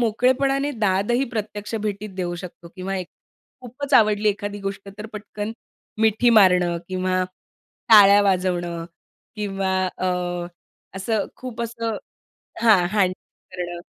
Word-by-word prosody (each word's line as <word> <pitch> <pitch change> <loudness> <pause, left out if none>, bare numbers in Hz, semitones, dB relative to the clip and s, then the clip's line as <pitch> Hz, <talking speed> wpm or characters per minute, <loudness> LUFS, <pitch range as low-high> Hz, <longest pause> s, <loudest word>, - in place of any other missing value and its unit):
मोकळेपणाने 260 +5 +2
दादही 215 +2 +1
प्रत्यक्ष 210 -1 -4
भेटीत 210 -1 -3
देऊ 175 -2 -2
शकतो. 170 -1 -9
किंवा 190 +1 -3
एक 185 -2 -5 0.5
खूपच 265 +3 -4
आवडली 215 -2 +4
एखादी 205 0 -3
गोष्ट 195 0 -5
तर 215 - -6
पटकन, 210 0 -6 0.5
मिठी 220 +2 +4
मारणं 180 -5 +5
किंवा 185 0 0 0.7
टाळ्या 205 -2 +8
वाजवणं 180 -3 0 0.5
किंवा 195 -2 -1 0.2
अ, 185 - -1 0.9
असं 210 +3 -1
खूप 250 -3 -7
असं 230 -1 -3 0.7
हां, 215 -6 +5
हँडल 195 -3 +2 0.4
करणं. 175 -1 -5
205 Hz, 115 wpm, -23 LUFS, 185-225 Hz, 0.9 s, टाळ्या